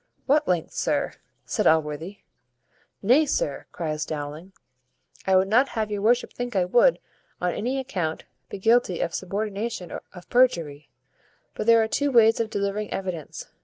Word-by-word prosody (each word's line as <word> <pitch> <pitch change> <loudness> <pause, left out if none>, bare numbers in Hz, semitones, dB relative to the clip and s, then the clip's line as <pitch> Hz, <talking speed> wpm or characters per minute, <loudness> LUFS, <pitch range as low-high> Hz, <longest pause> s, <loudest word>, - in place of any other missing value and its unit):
"What 295 +2 +3
lengths, 175 -3 -1
sir?" - - 0 0.3
said - - 0
Allworthy. 160 +4 0 0.8
"Nay, 265 +9 +4
sir," - - -2
cries 155 -3 -3
Dowling, 155 +4 -6 0.8
"I 190 - +4
would 190 +1 +4
not 245 +7 +3
have 215 -1 -1
your 205 -1 -2
worship 240 +4 +2
think 245 -2 -5
I 185 -2 +3
would, 245 - +4 0.4
on 180 -1 0
any 250 +5 -2
account, 185 -12 -3 0.3
be - - -6
guilty 220 -3 +2
of 170 - -1
subornation 205 -1 -3 0.2
of 180 -1 -13
perjury; 170 - +2 0.6
but - - -5
there 230 -1 +6
are - - -1
two 285 +5 0
ways 225 -2 +5
of 225 -1 -1
delivering 205 +1 -2
evidence. 180 -6 -5
200 Hz, 155 wpm, -25 LUFS, 175-235 Hz, 0.8 s, there